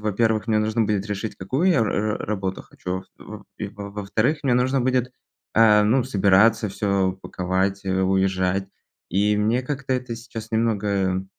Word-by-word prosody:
во-первых, 110 +1 0
мне 110 -1 +3
нужно 110 +1 +1
будет 105 -2 -1
решить, 105 +1 -4
какую 130 - 0
я 170 - +3
р 115 - +2
р 105 +2 -1
работу 95 -3 -3
хочу. 95 +1 -6
И - - -13
в 105 -1 -10
в - - -50
и 105 - -4
во-вторых, 105 +7 -2
мне 135 -3 +1
нужно 130 +2 +2
будет 125 0 0 0.4
собираться, 105 -1 +4
всё 100 -1 0
паковать, 95 +2 -1
уезжать. 95 0 +1 0.4
И 105 +3 +2
мне 110 +4 +1
как-то 135 0 -3
это 125 -2 -3
сейчас 115 -1 -9
немного 100 -4 0
105 Hz, 155 wpm, -23 LUFS, 95-115 Hz, 0.4 s, собираться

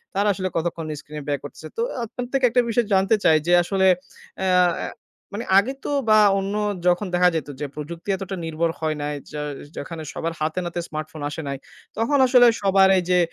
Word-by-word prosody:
তারা 200 +1 +2
আসলে 185 0 -3
কতক্ষণ 165 -1 -2
স্ক্রিনে 150 -1 -9
ব্যয় 145 -1 -1
করতেছে। 155 +2 -9
তো - - 0 0.2
আপনার 245 +3 -6
থেকে 265 -2 +3
একটা 245 +1 +3
বিষয় 235 0 +1
জানতে 195 +3 +4
চাই 160 -1 +5
যে, 175 - +4
আসলে 190 +1 +2 0.5
অ্যা 185 -1 +3 0.7
মানে 230 - -4
আগে 240 +7 +3
তো - - -2 0.2
বা 215 0 +7 0.2
অন্য 195 +1 -3 0.3
যখন 180 +3 +2
দেখা 180 0 +5
যেত 155 -3 -2
যে 145 - -2
প্রযুক্তি 165 +5 -7
এতটা 195 0 -5
নির্ভর 165 +1 -1
হয় 155 -1 -1
নাই। 150 0 -2 0.2
য - - -7 0.4
যেখানে 160 +2 -6
সবার 165 0 -3
হাতেনাতে 175 +3 -2
স্মার্টফোন 155 0 -6
আসে 160 - -5
নাই, 140 - -3 0.4
তখন 280 +6 +2
আসলে 250 -1 +6
সবার 195 -1 +5
এই 180 - +1
যে 180 0 +4
180 Hz, 190 wpm, -23 LUFS, 160-200 Hz, 0.7 s, বা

